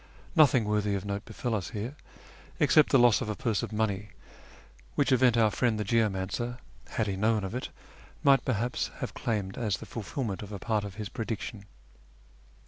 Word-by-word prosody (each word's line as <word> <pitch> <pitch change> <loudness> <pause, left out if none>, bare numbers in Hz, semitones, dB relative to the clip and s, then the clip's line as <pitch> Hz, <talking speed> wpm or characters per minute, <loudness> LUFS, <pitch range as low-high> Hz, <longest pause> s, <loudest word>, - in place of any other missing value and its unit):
Nothing 130 -8 +5
worthy 105 -1 +1
of 95 0 -4
note 100 0 -3
befell 115 +2 -3
us 100 -5 -2
here, 115 +6 -5 0.6
except 155 - +5
the 135 - +5
loss 120 -2 +5
of 115 - -3
a 105 - -1
purse 110 -2 0
of - - -5
money, 105 -2 -1 0.9
which 145 - +2
event 125 -2 +5
our 110 -2 +4
friend 115 -2 +1
the - - 0
geomancer, 110 +2 0 0.3
had 110 - -1
he 100 -2 -2
known 110 +1 +1
of 95 - -4
it, 125 - -3 0.5
might 135 -1 +5
perhaps 120 0 -1
have - - -4
claimed 105 -2 -2
as 105 -5 0
the - - -9
fulfilment 115 -2 -4
of 105 -1 -8
a 100 - -4
part 105 +1 -1
of 100 -2 -7
his 105 -1 -4
prediction. 110 -1 -5
110 Hz, 185 wpm, -29 LUFS, 100-120 Hz, 0.9 s, Nothing